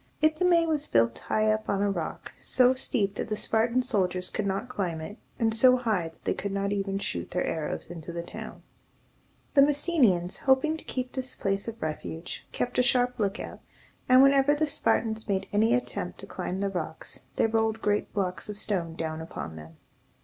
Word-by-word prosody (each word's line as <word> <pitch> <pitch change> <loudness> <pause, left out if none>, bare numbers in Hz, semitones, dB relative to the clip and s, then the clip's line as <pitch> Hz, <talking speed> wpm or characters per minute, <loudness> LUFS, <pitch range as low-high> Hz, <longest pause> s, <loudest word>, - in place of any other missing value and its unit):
Ithome 335 +2 +4
was 310 -3 -1
built 115 0 +2
high 215 0 +1
up 215 0 -4
on 200 0 +1
a 200 - +2
rock, - - -4
so 255 0 +4
steep 220 -6 0
that - - -4
the 215 - -1
Spartan 230 +4 +1
soldiers 185 -5 0
could 210 -2 -2
not 195 +5 -2
climb 180 -8 -2
it, 205 +7 -8 0.2
and 225 -2 +2
so 255 +3 +6
high 215 -9 0
that 165 - -25
they - - +1
could 200 - -4
not 200 0 -1
even 195 -1 -1
shoot 85 - -4
their 180 - -1
arrows 155 -2 -3
into 170 -1 -8
the 170 0 -4
town. - - -9 0.9
The 280 - +7
Messenians, 275 - +3
hoping 270 +4 +3
to - - -12
keep 255 -1 -3
this 260 -1 -4
place 195 +1 -1
of 230 0 -6
refuge, 160 +2 -5
kept 245 - -1
a - - +7
sharp 250 0 +2
lookout, 205 0 -2 0.5
and, 255 +1 +8
whenever 275 +1 +5
the 310 +1 +1
Spartans 225 -7 0
made 195 -2 -1
any 220 +3 +4
attempt 250 - -3
to - - -8
climb 185 +2 -4
the 200 - +1
rocks, 170 -4 -4 0.2
they - - +3
rolled 225 0 +1
great 210 -1 0
blocks 185 -2 -2
of 210 - -5
stone 175 -6 -2
down 160 -1 -3
upon 80 - -6
them. 80 +1 -11
210 Hz, 195 wpm, -28 LUFS, 180-250 Hz, 0.9 s, and